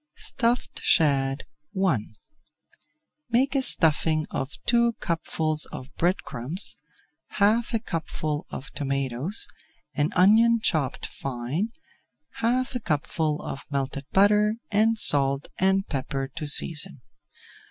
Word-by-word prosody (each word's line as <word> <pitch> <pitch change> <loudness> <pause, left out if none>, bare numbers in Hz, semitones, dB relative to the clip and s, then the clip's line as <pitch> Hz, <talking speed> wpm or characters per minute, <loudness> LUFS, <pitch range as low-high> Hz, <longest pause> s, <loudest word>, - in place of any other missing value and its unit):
STUFFED 250 - -1
SHAD 135 -3 +1 0.4
I 135 -11 +1 1.3
Make 255 +4 +1
a 275 - +1
stuffing 155 - +2
of 135 - -4 0.2
two 235 -1 +2
cupfuls 160 -4 -2
of 130 +3 -10
bread 180 +3 0
crumbs, 135 - +1 0.6
half 215 +3 +1
a - - 0
cupful 155 -6 -5
of 135 - -8
tomatoes, 140 - +4 0.5
an 145 +2 0
onion 225 +5 +4
chopped 155 - -1
fine, 135 - -4 0.7
half 250 +3 -1
a 250 - -3
cupful 155 -3 -2
of 135 - -6
melted 140 0 -4
butter, 210 +2 +3 0.2
and 220 +2 +2
salt 140 -6 +4
and 190 +1 +2
pepper 135 -1 -4
to 155 0 -7
season. 150 -2 +3
160 Hz, 110 wpm, -24 LUFS, 140-215 Hz, 1.3 s, tomatoes